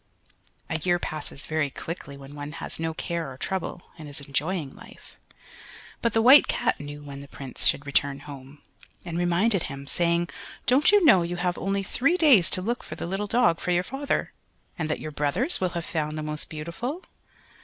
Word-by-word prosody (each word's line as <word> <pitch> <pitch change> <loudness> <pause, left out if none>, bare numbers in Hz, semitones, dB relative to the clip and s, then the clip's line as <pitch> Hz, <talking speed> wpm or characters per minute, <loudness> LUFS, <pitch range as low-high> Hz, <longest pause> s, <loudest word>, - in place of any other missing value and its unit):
A 160 -3 -2
year 175 +2 +2
passes 155 -4 -5
very 155 -2 0
quickly 140 -1 -7
when 140 +1 -11
one 145 0 -6
has - - -4
no 165 0 -1
care 165 -2 -3
or 130 - -10
trouble, 185 +2 -3 0.2
and 155 -2 -8
is 145 - -5
enjoying 145 +2 -2
life. - - -15 0.8
But 235 -2 +1
the 225 - +3
White 270 +4 +9
Cat - - 0
knew 145 0 -7
when 140 -1 -8
the 140 - -9
Prince 135 -2 -3
should 140 - +1
return 140 0 +1
home, 140 0 -11 0.4
and 170 -2 -5
reminded 175 +4 +2
him, 140 0 -7
saying, 170 +3 +1 0.4
"Don't 260 - +5
you 410 -4 +5
know 190 - +7
you 170 +1 -2
have 175 0 0
only 195 +1 -1
three 280 - +1
days 255 - +6
to 185 - +2
look 235 +4 -1
for 155 - -7
the - - -5
little 195 +4 -2
dog 230 -7 +3
for - - -4
your 175 0 +3
father, 270 +7 -2 0.4
and 160 -2 -3
that 155 - -1
your 155 - -6
brothers 145 - +1
will 185 - +2
have 170 - -3
found 155 -1 -2
the 155 - -3
most 150 0 -4
beautiful?" 170 - -5
170 Hz, 195 wpm, -26 LUFS, 145-195 Hz, 0.8 s, White